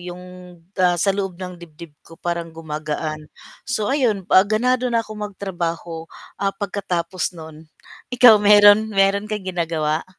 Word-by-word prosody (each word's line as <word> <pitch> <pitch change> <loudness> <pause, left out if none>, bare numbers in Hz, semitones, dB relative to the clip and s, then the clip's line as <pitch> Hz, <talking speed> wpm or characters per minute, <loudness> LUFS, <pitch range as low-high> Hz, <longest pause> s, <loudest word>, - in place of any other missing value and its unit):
yung, 180 0 -9 0.6
ah, 180 -1 +3
sa 195 - +3
loob 195 -3 -3
ng 180 -1 -7
dibdib 165 -1 -12
ko 165 - -16
parang 170 -1 -3
gumagaan. 155 -1 -5 0.4
So 220 -5 -1
ayun 225 -9 0
'pa 185 - +6
ganado 250 +3 +1
na 230 -1 +1
akong 215 -1 -9
magtrabaho, 170 -4 -5 0.3
ah, 195 0 -1
pagkatapos 185 -4 -3
no'n 160 -1 -11 0.5
ikaw 245 -3 +7
mayro'n, 205 +1 +6
mayro'n 195 +1 +2
kang 210 -3 -4
ginagawa? 165 -4 -2
185 Hz, 140 wpm, -21 LUFS, 165-205 Hz, 0.6 s, ikaw